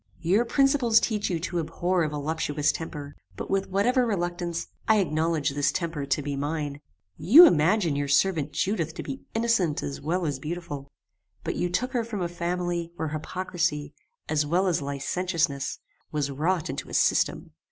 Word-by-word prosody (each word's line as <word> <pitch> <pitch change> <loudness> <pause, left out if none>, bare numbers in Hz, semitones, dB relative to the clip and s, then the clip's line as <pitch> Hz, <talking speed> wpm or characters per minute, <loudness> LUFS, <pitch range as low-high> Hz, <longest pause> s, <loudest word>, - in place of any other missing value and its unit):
Your 195 +8 +2
principles 270 -3 +4
teach 215 -3 -1
you 175 -3 -1
to 175 0 -2
abhor 175 +3 0
a 155 - +1
voluptuous 150 0 0
temper; 145 -3 -7 0.2
but, - - -6
with 195 0 0
whatever 240 +7 +2
reluctance, 175 -5 -2 0.2
I 220 -1 +5
acknowledge 160 -4 +1
this 145 0 +1
temper 160 -5 -3
to 140 +1 0
be 140 0 -3
mine. 145 0 -3 0.4
You 310 - +9
imagine 170 - +3
your 145 0 -1
servant 150 +1 +2
Judith 165 -1 -1
to - - -5
be 270 - -6
innocent 225 -9 +1
as 140 - -5
well 170 +4 -1
as 145 -3 -2
beautiful; 150 -3 -6 0.5
but - - -2
you 175 - -1
took 250 +9 -1
her 245 -3 0
from 215 -5 -4
a - - 0
family 175 0 -2
where 160 -2 -3
hypocrisy, 155 -2 -2 0.3
as 155 -1 +1
well 175 +6 +1
as 175 -4 +1
licentiousness, 140 +1 -1 0.3
was 145 -2 -1
wrought 160 +5 0
into 135 - -5
a - - -5
system. - - +1
170 Hz, 170 wpm, -26 LUFS, 150-185 Hz, 0.5 s, You